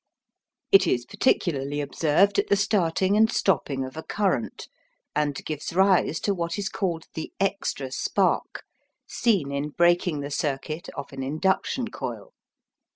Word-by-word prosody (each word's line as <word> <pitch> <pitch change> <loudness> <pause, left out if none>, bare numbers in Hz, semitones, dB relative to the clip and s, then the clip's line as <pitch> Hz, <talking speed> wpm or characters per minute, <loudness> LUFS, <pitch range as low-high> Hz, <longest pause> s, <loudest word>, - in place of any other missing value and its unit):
It 390 - +6
is 120 -1 +1
particularly 145 - 0
observed 160 +7 +2
at - - 0
the - - +4
starting 195 -2 +1
and 220 +2 +4
stopping 140 - 0
of 130 - -9
a 160 - -5
current, 190 - -2 0.5
and 150 -1 +1
gives 155 +1 -4
rise 190 -4 +3
to 200 - +1
what 170 -1 -3
is 200 -2 -2
called 175 -6 -2
the 160 - -5
"extra 190 -9 -1
spark" - - 0 0.4
seen 195 - +1
in 140 +2 -2
breaking 175 -1 +2
the 140 +1 -5
circuit 145 +3 -3
of 140 - -7
an 135 - -5
induction 190 - 0
coil. - - -6
165 Hz, 145 wpm, -25 LUFS, 145-195 Hz, 0.5 s, It